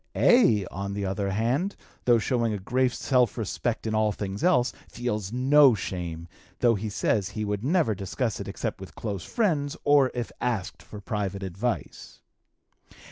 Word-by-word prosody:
A., 195 - +5
on 100 +2 -4
the 100 0 -2
other 100 +1 -1
hand, 125 - 0 0.3
though 120 -1 +5
showing 115 -1 0
a - - -2
great 125 +6 +1
self 125 -3 +1
respect 115 +1 -2
in 110 - -1
all 110 0 +2
things 100 -1 -5
else, 125 -9 +3 0.2
feels 110 -5 -3
no 135 +1 +5
shame, 85 -3 -5 0.3
though 120 -2 +4
he 110 0 -3
says 105 -1 0
he 110 +1 -4
would 105 0 -2
never 155 -4 +2
discuss 100 +4 -3
it - - -6
except - - -4
with - - -10
close 100 -6 -4
friends 155 - 0
or 145 -2 +5
if 120 -2 -3
asked 110 -7 -2
for 105 - -10
private 100 -3 -3
advice. 95 +6 -4
110 Hz, 165 wpm, -26 LUFS, 100-125 Hz, 0.3 s, A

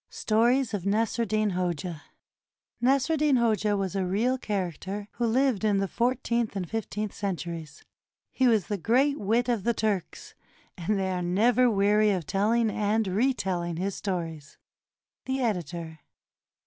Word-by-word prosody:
STORIES 235 +3 +1
OF 205 - -1
NASR 215 +5 0
EDDIN 215 0 0
HOJA 175 -3 -3 0.8
[Nasr 270 +4 +2
eddin 300 -3 +3
Hoja 215 -3 +1
was 195 -1 -2
a 195 - 0
real 215 +8 +1
character, 195 -1 -4
who 240 - -1
lived 250 -2 +1
in 210 -2 +3
the 195 0 0
fourteenth 235 -1 0
and 185 -3 -3
fifteenth 215 -1 -4
centuries. 170 -5 -5 0.5
He 260 - +2
was 220 -5 +3
the 205 -2 -3
great 270 - +2
wit 230 +4 +1
of 235 -5 0
the 235 +1 +1
Turks, 205 -5 -2 0.4
and 195 +3 -1
they 190 -1 -1
are 180 -1 -2
never 225 +8 +3
weary 210 0 +3
of 185 -5 -1
telling 220 +6 +1
and 215 +2 0
reteUing 190 -5 0
his 195 +3 -2
stories. 165 -7 -5 0.7
The 265 0 -1
Editor. 170 - -3
210 Hz, 150 wpm, -27 LUFS, 185-235 Hz, 0.8 s, eddin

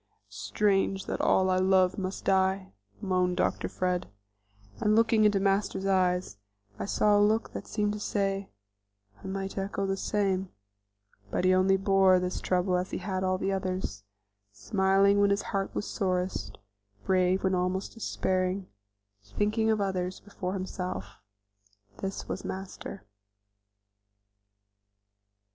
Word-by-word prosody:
"Strange 195 -2 0
that - - -3
all 185 0 +3
I 185 - +2
love 185 0 +3
must 190 0 -4
die!" 190 - +1 0.3
moaned 180 -1 +1
Dr. - - 0
Fred; 180 -1 -1 0.7
and 210 0 +3
looking 225 -1 +4
in 205 -2 +3
Master's 195 0 +1
eyes 180 - +1 0.4
I - - -2
saw 210 +1 +3
a 205 - +5
look 215 +2 +2
that - - -6
seemed 210 -1 0
to 210 - -5
say, 195 -1 -1 0.7
"I - - -6
might 195 0 -4
echo 195 0 -2
the 195 0 0
same," 195 -2 0 0.8
but 180 - -1
he 185 - +5
only 190 +1 +4
bore 195 -1 +4
this 180 0 -2
trouble 180 0 +1
as 180 +1 -2
he - - -3
had 190 0 -3
all 185 0 +1
the 190 +1 -1
others, 185 - -3 0.5
smiling 190 - +2
when 200 - +4
his 200 0 +1
heart 195 -1 0
was - - -2
sorest; 180 - -2 0.5
brave 185 0 +2
when 190 0 +2
almost 185 +1 -1
despairing; 185 -3 -1 0.6
thinking 210 - 0
of 220 -1 +2
others 185 -2 -2
before 190 -2 -5
himself 180 - -5 0.8
this 195 0 -4
was - - -4
Master. 190 - -7
190 Hz, 135 wpm, -29 LUFS, 185-195 Hz, 0.8 s, a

